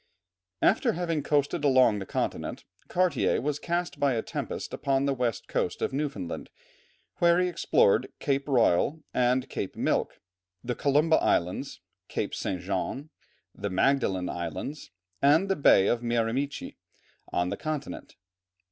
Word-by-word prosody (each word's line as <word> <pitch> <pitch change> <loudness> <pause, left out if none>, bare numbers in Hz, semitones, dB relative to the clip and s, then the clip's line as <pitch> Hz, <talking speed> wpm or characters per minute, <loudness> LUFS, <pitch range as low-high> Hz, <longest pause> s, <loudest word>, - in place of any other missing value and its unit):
After - - +3
having 165 -3 -1
coasted 145 +2 0
along 130 -6 +4
the 95 - -7
continent, - - -3 0.2
Cartier 180 -6 +1
was 145 +2 -2
cast 175 +2 -2
by 140 -2 +3
a 115 - -1
tempest - - -5
upon 135 0 0
the 140 - +1
west 120 -4 -2
coast - - -1
of - - -2
Newfoundland, 135 - -4 0.7
where 170 0 +4
he 180 - +2
explored 130 - +2
Cape 140 0 -1
Royal 135 - +2
and 125 +1 +2
Cape 100 - -5
Milk, - - -1 0.4
the 125 - -2
Columba 150 +5 +3
Islands, 90 +1 0 0.3
Cape - - -3
St. 90 -2 -3
John, 100 - -3 0.4
the 100 - -4
Magdalen 95 -3 +1
Islands, 85 - -5 0.3
and 155 +8 +4
the 195 - +2
Bay 100 - +5
of 120 +3 +1
Miramichi 120 +4 -2 0.5
on 90 0 0
the - - -2
continent. 155 -3 -5
135 Hz, 140 wpm, -28 LUFS, 115-150 Hz, 0.7 s, Bay